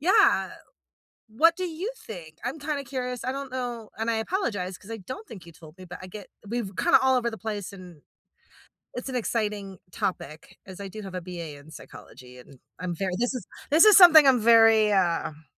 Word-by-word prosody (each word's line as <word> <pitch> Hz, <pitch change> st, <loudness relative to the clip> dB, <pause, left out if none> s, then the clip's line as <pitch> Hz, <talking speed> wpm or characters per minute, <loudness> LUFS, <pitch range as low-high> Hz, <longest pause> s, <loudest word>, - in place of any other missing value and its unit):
yeah, 400 Hz, +5 st, +3 dB, 0.8 s
what 320 Hz, +10 st, +3 dB
do 370 Hz, -, -4 dB
you 355 Hz, +6 st, -5 dB
think? 170 Hz, -, -11 dB
I'm 265 Hz, +6 st, -4 dB
kinda 290 Hz, -1 st, -3 dB
curious, 250 Hz, -1 st, -5 dB
I 255 Hz, -, -2 dB
don't 275 Hz, -1 st, -6 dB
know, 245 Hz, -4 st, -5 dB
and 225 Hz, +1 st, -1 dB
I -, -, 0 dB
apologize 220 Hz, -, -3 dB
'cause 205 Hz, -, -13 dB
I 225 Hz, -, -5 dB
don't 260 Hz, -, -9 dB
think 190 Hz, -6 st, -11 dB
you 170 Hz, -, -13 dB
told 160 Hz, +1 st, -16 dB
me, 185 Hz, -, -12 dB
but 180 Hz, +1 st, -9 dB
I 185 Hz, -, -9 dB
get 200 Hz, +1 st, -10 dB, 0.2 s
we've 225 Hz, -3 st, -3 dB
kinda 345 Hz, -, +4 dB
all 265 Hz, -1 st, +3 dB
over 235 Hz, -1 st, -1 dB
the 220 Hz, -, -8 dB
place. 205 Hz, -3 st, -5 dB
And, 180 Hz, -5 st, -13 dB, 0.9 s
it's 250 Hz, +2 st, -5 dB
an 255 Hz, -, -4 dB
exciting 210 Hz, -5 st, -3 dB
topic 155 Hz, -4 st, -5 dB
as 190 Hz, 0 st, -11 dB
I 200 Hz, -, -6 dB
do 215 Hz, +3 st, -9 dB
have 190 Hz, -2 st, -9 dB
a 185 Hz, -, -3 dB
BA 170 Hz, -4 st, -8 dB
in 145 Hz, +2 st, -16 dB
psychology, 125 Hz, -5 st, -13 dB
and 130 Hz, +2 st, -16 dB, 0.2 s
I'm 180 Hz, -1 st, -3 dB
very 190 Hz, +1 st, -2 dB
this 245 Hz, +3 st, -1 dB
is 245 Hz, -7 st, -6 dB, 0.2 s
this 315 Hz, +6 st, +6 dB
is 425 Hz, -2 st, +8 dB
something 320 Hz, -5 st, +9 dB
I'm 260 Hz, -3 st, +5 dB
very, 225 Hz, -1 st, +5 dB
um 170 Hz, -4 st, 0 dB
220 Hz, 210 wpm, -26 LUFS, 185-260 Hz, 0.9 s, something